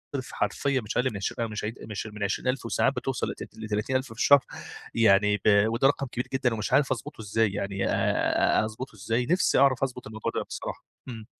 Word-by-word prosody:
رف 130 Hz, -1 st, -4 dB
حرفيًا 140 Hz, -3 st, 0 dB
مش 105 Hz, -, -4 dB
أقل 125 Hz, -4 st, 0 dB
عشر 115 Hz, +3 st, -2 dB
مش 110 Hz, -1 st, -5 dB
ع -, -, 0 dB, 0.2 s
مش 105 Hz, 0 st, -5 dB
من 105 Hz, -1 st, -6 dB
20 100 Hz, +5 st, -2 dB
ألف، 130 Hz, 0 st, -1 dB
وساعات -, -, +1 dB
بتوصل -, -, -2 dB
لت -, -, -10 dB
لتلاتين 110 Hz, +3 st, -2 dB
ألف 130 Hz, +1 st, +1 dB
في 115 Hz, -, -13 dB
الشهر، 140 Hz, +4 st, +5 dB, 0.5 s
يعني 105 Hz, -2 st, +4 dB
ب -, -, -23 dB, 0.3 s
وده 115 Hz, +4 st, +3 dB
رقم 140 Hz, -1 st, 0 dB
كبير 125 Hz, 0 st, -4 dB
جدًا، 125 Hz, -3 st, +1 dB
ومش 110 Hz, +3 st, -3 dB
عارف 140 Hz, 0 st, +4 dB
أضبطه 130 Hz, -1 st, -4 dB
إزاي 110 Hz, 0 st, +1 dB
يعني 100 Hz, 0 st, -2 dB
آآ، -, -, +2 dB
أضبطه 110 Hz, +2 st, -7 dB
إزاي، 115 Hz, +5 st, -1 dB
نفسي 180 Hz, +8 st, +2 dB
أعرف 135 Hz, -1 st, +4 dB
أضبط 125 Hz, -2 st, -3 dB
الموضوع 110 Hz, -1 st, -4 dB
ده -, -, 0 dB
بصراحة، -, -, -7 dB, 0.2 s
إمم. 115 Hz, -4 st, -7 dB
115 Hz, 205 wpm, -27 LUFS, 105-130 Hz, 0.5 s, الشهر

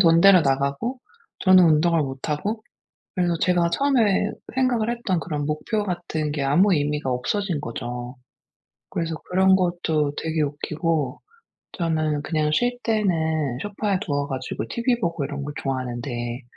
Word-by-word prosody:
돈대로 175 Hz, +1 st, +7 dB
나가고 140 Hz, -, 0 dB, 0.4 s
저는 185 Hz, -1 st, +7 dB
운동을 165 Hz, 0 st, +4 dB
못하고 150 Hz, -, -3 dB, 0.5 s
그래서 175 Hz, -2 st, +1 dB
제가 175 Hz, -2 st, +2 dB
처음에 225 Hz, -4 st, +2 dB, 0.3 s
생각을 245 Hz, -4 st, +2 dB
했던 230 Hz, -7 st, -1 dB
그런 150 Hz, -4 st, -3 dB
목표 180 Hz, +8 st, -1 dB
같은 170 Hz, -5 st, -3 dB
게 145 Hz, -2 st, -2 dB
아무 165 Hz, +9 st, +4 dB
의미가 150 Hz, -2 st, -1 dB
없어진 165 Hz, +7 st, -1 dB
거죠. 120 Hz, 0 st, -6 dB, 0.8 s
그래서 165 Hz, -1 st, -2 dB
그런 190 Hz, +1 st, +5 dB
것도 175 Hz, -5 st, 0 dB
되게 160 Hz, -1 st, -1 dB
웃기고 150 Hz, -1 st, -2 dB, 0.5 s
저는 155 Hz, -3 st, 0 dB
그냥 155 Hz, -1 st, 0 dB
쉴 245 Hz, +9 st, +1 dB
때는 160 Hz, -, 0 dB
소파에 205 Hz, -1 st, -1 dB
누워 145 Hz, -1 st, -1 dB
가지고 130 Hz, -2 st, -4 dB
티비 235 Hz, 0 st, 0 dB
보고 170 Hz, -8 st, -1 dB
이런 140 Hz, 0 st, -5 dB
거 145 Hz, -, -5 dB
좋아하는데 120 Hz, -2 st, -3 dB
160 Hz, 300 characters per minute, -23 LUFS, 145-190 Hz, 0.8 s, 돈대로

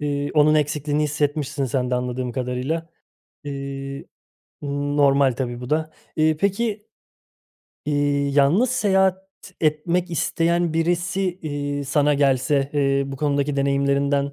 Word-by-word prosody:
Eee, 145 Hz, -1 st, -2 dB
onun 150 Hz, 0 st, +5 dB
eksikliğini 150 Hz, 0 st, 0 dB
hissetmişsin 145 Hz, -1 st, -1 dB
sen 125 Hz, 0 st, -1 dB
de 125 Hz, -, +1 dB
anladığım 125 Hz, 0 st, -2 dB
kadarıyla. 130 Hz, +6 st, -2 dB, 0.6 s
Eee, 140 Hz, -1 st, -6 dB, 0.6 s
normal, 140 Hz, -1 st, +2 dB
tabii, 120 Hz, -1 st, -4 dB
bu 125 Hz, -, -7 dB
da. 155 Hz, +1 st, 0 dB, 0.3 s
Eee, 155 Hz, 0 st, +2 dB
peki, 210 Hz, +3 st, -1 dB, 1.0 s
eee, 145 Hz, -1 st, +1 dB
yalnız 145 Hz, -, +3 dB
seyahat 190 Hz, -5 st, +2 dB, 0.3 s
etmek 170 Hz, +3 st, 0 dB
isteyen 170 Hz, +1 st, 0 dB
birisi, 175 Hz, +3 st, 0 dB, 0.2 s
eee, 145 Hz, -2 st, -3 dB
sana 145 Hz, +1 st, +2 dB
gelse, 140 Hz, 0 st, +2 dB
eee, 140 Hz, -1 st, +2 dB
bu 135 Hz, 0 st, -6 dB
konudaki 145 Hz, 0 st, 0 dB
deneyimlerinden, 140 Hz, 0 st, +1 dB
145 Hz, 115 wpm, -22 LUFS, 140-155 Hz, 1.0 s, onun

